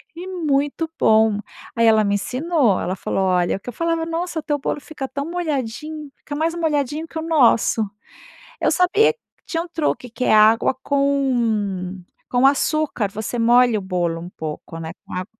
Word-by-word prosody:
e 350 +2 -7
muito 310 -3 -1
bom. 220 -1 +4 0.4
Aí 230 0 +3
ela 220 -1 +5
me 200 -1 +1
ensinou, 255 - +1
ela 185 - -2
falou: 190 0 -2
"Olha" 180 -1 +1
Que 220 - -9
eu 245 - -7
falava: 330 +1 -1
"Nossa 330 -1 -3
teu 295 -1 -1
bolo 285 - -2
fica 280 -2 -7
tão 280 +1 -4
molhadinho, 305 -3 -4
fica 290 - -7
mais 320 +2 0
molhadinho 310 -2 -1
que 325 - -9
o - - -2
nosso." 260 -8 +3 0.8
Eu - - +2
sabia 365 +4 +4 0.3
tinha 330 -1 -2
um 350 - -12
truque 310 -6 -2
que 250 +2 -4
é - - +3
água 215 +3 +5
com 230 -10 0 0.3
com 250 +2 +4
açúcar, 285 -5 +1
você 215 +4 -4
molha 240 0 +4
o - - -5
bolo 175 -3 -1
um 175 - -8
pouco, 160 0 -7
né, 160 0 -6
com - - -13
água 185 +1 -3
265 Hz, 175 wpm, -21 LUFS, 215-315 Hz, 0.8 s, ela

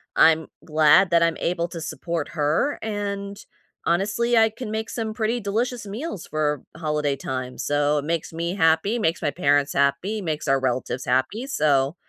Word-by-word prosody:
I'm 160 0 +5 0.2
glad 155 +4 +5
that 170 0 +5
I'm 165 -1 +2
able 170 0 -1
to 170 -1 -7
support 160 +1 -4
her 155 - 0
and, 200 -2 -4 0.5
honestly, 205 +7 +1
I 225 0 +6
can 220 0 -7
make 220 +1 -3
some 225 -2 -3
pretty 225 +2 -1
delicious 230 +4 -2
meals 210 - -6
for 150 -3 -1
holiday 150 -3 -1
time. 130 -1 -5
So 145 +1 +1
it 145 - -6
makes 165 0 -2
me 170 +2 -2
happy, 165 +5 +3
makes 165 -5 0
my 145 - 0
parents 145 -2 +2
happy, 140 +10 +1
makes 155 -4 -3
our 135 -1 +3
relatives 130 0 -2
happy. 130 - 0
So, 145 - +2
165 Hz, 170 wpm, -24 LUFS, 145-205 Hz, 0.5 s, I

